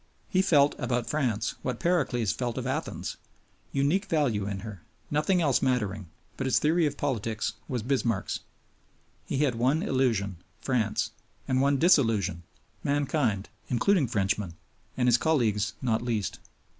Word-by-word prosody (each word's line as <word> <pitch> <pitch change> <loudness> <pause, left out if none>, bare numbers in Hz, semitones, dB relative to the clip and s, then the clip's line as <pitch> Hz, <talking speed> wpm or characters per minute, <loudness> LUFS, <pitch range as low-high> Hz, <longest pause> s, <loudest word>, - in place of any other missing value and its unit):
He 185 - +3
felt 145 -7 +4
about 125 -2 0
France 120 -7 0
what 125 -2 -3
Pericles 135 - +1
felt 120 -2 -3
of - - -3
Athens - - -3 0.5
unique 145 +9 +1
value 130 - +1
in 100 -1 -4
her, 110 -4 -8 0.3
nothing 160 +5 +2
else 140 -5 +3
mattering; 105 -7 0 0.3
but 135 - -2
his 130 - +3
theory 160 +1 +3
of 145 0 -4
politics 110 -5 -1
was 125 -4 -2
Bismarck's. 120 -5 0 0.9
He 140 - 0
had 135 -4 +2
one 130 +8 +1
illusion 110 -8 +1 0.2
France; 115 -4 0 0.4
and 130 0 +2
one 140 0 +3
disillusion 115 - +3 0.4
mankind, 140 -8 0 0.2
including 145 - +3
Frenchmen, 100 -5 -1 0.4
and 125 -1 +2
his 120 -1 +5
colleagues 115 -10 +1
not 115 -3 +1
least. 115 -4 -2
125 Hz, 140 wpm, -28 LUFS, 110-145 Hz, 0.9 s, his